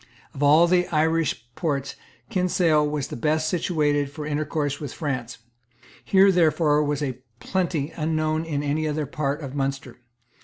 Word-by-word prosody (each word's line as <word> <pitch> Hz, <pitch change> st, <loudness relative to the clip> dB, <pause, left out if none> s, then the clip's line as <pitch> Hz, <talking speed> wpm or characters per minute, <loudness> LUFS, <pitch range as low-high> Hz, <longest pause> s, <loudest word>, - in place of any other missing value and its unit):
Of 135 Hz, -, -8 dB
all 150 Hz, +4 st, +6 dB
the 180 Hz, 0 st, +2 dB
Irish 160 Hz, -5 st, 0 dB
ports 140 Hz, -5 st, -2 dB, 0.4 s
Kinsale 175 Hz, -6 st, +2 dB
was 145 Hz, -3 st, -3 dB
the -, -, -5 dB
best 155 Hz, +5 st, 0 dB
situated 150 Hz, -4 st, 0 dB
for 150 Hz, +1 st, -7 dB
intercourse 150 Hz, -1 st, -2 dB
with 145 Hz, -4 st, -6 dB
France. 130 Hz, -6 st, -4 dB, 0.7 s
Here, 195 Hz, 0 st, +5 dB
therefore, 155 Hz, -4 st, +3 dB
was 145 Hz, 0 st, -1 dB
a 130 Hz, -3 st, -3 dB, 0.2 s
plenty 170 Hz, -5 st, -1 dB
unknown 155 Hz, 0 st, 0 dB
in 150 Hz, -3 st, -3 dB
any 150 Hz, +2 st, -1 dB
other 150 Hz, 0 st, -1 dB
part 145 Hz, +1 st, -2 dB
of 135 Hz, -3 st, -7 dB
Munster. 135 Hz, -3 st, -3 dB
150 Hz, 150 wpm, -24 LUFS, 145-160 Hz, 0.7 s, all